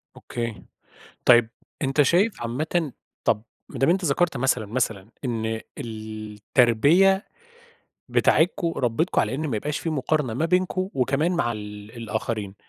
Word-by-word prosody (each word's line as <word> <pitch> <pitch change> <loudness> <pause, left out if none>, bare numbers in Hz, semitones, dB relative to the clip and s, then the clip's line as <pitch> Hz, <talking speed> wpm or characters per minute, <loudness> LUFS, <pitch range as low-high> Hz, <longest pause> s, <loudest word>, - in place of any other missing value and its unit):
أوكي. 115 -5 -5 0.6
طيب 120 -2 +6 0.3
أنت 135 +1 +2
شايف 180 - +2
عامةً 150 +6 -1 0.3
طب 105 - +1 0.3
ما - - -7
دام 135 - +3
أنت 180 +1 +2
ذكرت 155 0 +1
مثلًا 125 -3 +1
مثلًا 110 -3 -2 0.2
إن 110 -2 -2 0.2
التربية 115 - +2 0.8
بتاعتكم 170 +1 +3
ربتكم 130 +8 +1
على 130 - -1
إن 155 +2 -2
ما 115 - -1
يبقاش 145 +7 -3
في 165 - -3
مقارنة 145 -3 0
ما 130 +8 0
بينكم 185 +2 +1
وكمان 135 +6 +1
مع 170 -9 +1
ال 105 -1 -8
الآخرين، 110 -2 -3
125 Hz, 130 wpm, -24 LUFS, 110-160 Hz, 0.8 s, طيب